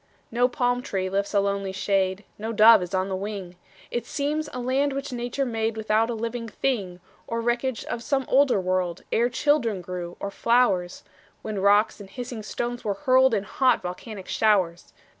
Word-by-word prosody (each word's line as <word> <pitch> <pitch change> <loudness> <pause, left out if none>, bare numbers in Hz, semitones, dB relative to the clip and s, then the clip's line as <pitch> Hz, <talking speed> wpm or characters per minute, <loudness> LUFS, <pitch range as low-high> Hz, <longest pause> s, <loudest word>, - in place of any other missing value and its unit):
No 245 +2 +3
palm 245 0 0
tree 190 -5 -3
lifts 200 +1 -1
a 205 - +3
lonely 200 -1 -1
shade, 190 0 0 0.2
No 220 +2 -3
dove 220 -1 +7
is 180 - -5
on 185 0 0
the 190 - -2
wing; 195 -2 -5 0.4
It 240 -1 -3
seems 300 +1 -2
a 250 - -5
land 265 +3 +1
which 275 -1 -4
Nature 245 +3 -2
made 225 -2 -2
Without 220 +1 +1
a 235 - -2
living 230 +1 -4
thing, 205 -6 -2 0.3
Or 230 - -2
wreckage 240 +1 -1
of 235 - -4
some 270 +1 0
older 270 -5 +4
world, 185 -1 -1
Ere 235 +2 +2
children 250 -5 +1
grew, 175 -1 -6
or 200 - -4
flowers, 195 -6 +1 0.4
When 215 -2 -3
rocks 205 +3 +3
and 200 -2 -10
hissing 240 +2 -6
stones 240 +3 -4
were 205 -2 -1
hurled 260 +2 +4
In 200 - -1
hot, 255 +1 +2
volcanic 185 +2 -7
showers. 185 -6 +1
220 Hz, 180 wpm, -25 LUFS, 195-245 Hz, 0.4 s, dove